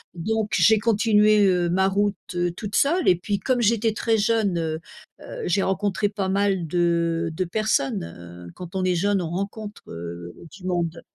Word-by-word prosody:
Donc 215 +5 -2
j'ai 220 -1 +5
continué, 215 -1 +4
heu, 180 -2 +2
ma 190 +2 +2
route, 205 +1 +1 0.2
heu, 175 0 0
toute 200 +3 -6
seule 340 +6 +2
et 180 - +5
puis 200 +3 -2
comme 255 -2 0
j'étais 225 0 +2
très 225 0 +1
jeune, 215 -3 +1
heu, 160 -1 -2 0.4
heu, - - -8
j'ai 190 +2 +1
rencontré 205 +2 0
pas 200 -2 -3
mal 195 -2 +1
de 170 0 0
de 185 - -1
personnes. 180 - 0 0.5
Heu, - - -12
quand 180 0 -9
on 190 - 0
est 180 - +2
jeune 200 +2 +1
on 165 - -4
rencontre, 205 +3 -5
heu, 85 +1 -7 0.2
du 185 -1 -12
monde 170 -2 -2
195 Hz, 185 wpm, -24 LUFS, 175-210 Hz, 0.5 s, j'ai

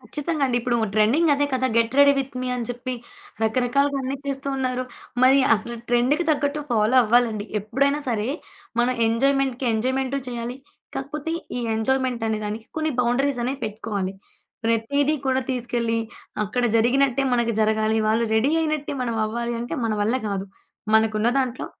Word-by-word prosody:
కచ్చితంగా 300 0 -3
అండి. 245 -2 0
ఇప్పుడు 240 0 0 0.2
ట్రెండింగ్ 245 +10 +4
అదే 290 +1 +1
కదా! 260 0 +1
Get 230 0 +2
ready 285 0 +8
with 270 0 -3
me. 255 - -3
అని 245 -1 -3
చెప్పి 245 +1 -4 0.5
రకరకాలుగా 255 +5 +1
అన్ని 265 +1 -2
చేస్తూ 275 0 -3
ఉన్నారు. 255 -1 -1 0.4
మరి 265 +2 +6
అసలు 230 +2 -3
ట్రెండ్‌కి 250 +8 +2
తగ్గట్టు 290 0 0
ఫాలో 225 +2 +3
అవ్వాలి 240 +2 +4
అండి. 210 -1 -4 0.2
ఎప్పుడైనా 275 +8 +1
సరే. 225 -1 -1 0.5
మనం 250 +1 +2
ఎంజాయ్మెంట్‌కి 265 +2 +1
ఎంజాయ్మెంటూ 260 +4 0
చేయాలి 240 0 -4 0.4
కాకపోతే 290 +3 -4 0.3
ఈ - - -2
ఎంజాయ్మెంటనే 230 -1 0
దానికి 215 +2 -5
కొన్ని 315 0 0
బౌండరీస్ 250 +3 +1
అనేవి 265 +3 -2
పెట్టుకోవాలి. 205 -3 -3 0.5
ప్రతీది 250 +7 +1
కూడా 260 0 +2
తీసుకెళ్ళి 235 -2 -1 0.5
అక్కడ 245 +4 -1
జరిగినట్టే 260 +3 +3
మనకు 235 -1 +2
జరగాలి 220 0 +2
వాళ్ళు 225 +2 +2
రెడీ 225 +6 +3
అయినట్టే 305 -2 -1
మనం 235 -2 -2
అవ్వాలి. 235 +2 -3
అంటే 240 - -4
మన 225 - 0
వల్ల 220 +5 +2
గాదు. 200 -2 -2 0.5
మనకున్న 220 0 +3
దాంట్లో 255 -2 -2
245 Hz, 150 wpm, -23 LUFS, 225-275 Hz, 0.5 s, రెడీ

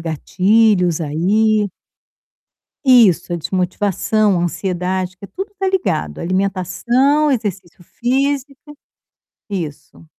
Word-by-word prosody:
gatilhos 180 +2 +2
aí. 205 +8 +1 1.2
Isso, 230 - +4
a - - 0
desmotivação, 190 +3 0
a - - -1
ansiedade, 185 +1 -2
que 195 - -13
tudo 390 - -7
está 385 -1 -2
ligado, 210 - -1
alimentação, 200 - +1
exercício 195 -8 -3
físico, 275 - -2 0.7
isso. 165 -5 -6
195 Hz, 90 wpm, -18 LUFS, 180-245 Hz, 1.2 s, Isso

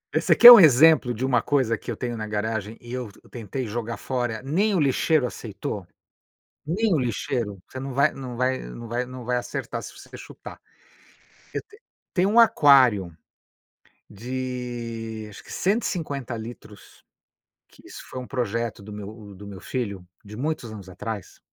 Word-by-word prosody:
E - - +3
você - - +3
quer 240 0 +12
um 235 - +12
exemplo 155 -3 +6
de 120 +2 -2
uma 125 -3 +2
coisa 130 -6 +1
que 115 - -10
eu 110 - -5
tenho 120 -1 -3
na 110 -1 -5
garagem, 110 +1 -3
e 120 +1 -10
eu 125 -4 -5 0.2
tentei 120 +2 -5
jogar 115 +1 -4
fora, 120 -3 -3
nem 200 +9 +1
o 180 - +2
lixeiro 145 +1 +2
aceitou? 100 -5 -6 0.8
Nem 200 +6 0
o 155 - +2
lixeiro. 115 -3 -2
Você 130 - -8
não 135 0 -5
vai 140 +3 +2
não 125 -3 -7
vai 130 +1 0
não 90 - -9
vai 120 +2 -2
não 125 -1 -9
vai 125 +1 0
acertar 120 - -4
se - - -9
você - - -13
quer - - -10
chutar. - - -11 0.9
Eu - - -2
te 420 +1 -20 0.3
tenho 185 +1 +2
um 230 - +4
aquário 125 - +5 0.9
de 120 -2 -5
acho 100 - -12
que - - -10
150 165 - -1
litros, 110 -2 -11 0.6
que - - -21
isso - - -10
foi 130 - -7
um 125 - -8
projeto 115 -4 -3
do 105 +1 -9
meu 105 0 -9
do 100 +2 -11
meu 100 -2 -9
filho, 100 -8 -5 0.2
de 105 +1 -10
muitos 140 -5 -3
anos 100 -3 -10
atrás. 105 +1 -7
120 Hz, 175 wpm, -24 LUFS, 110-135 Hz, 0.9 s, quer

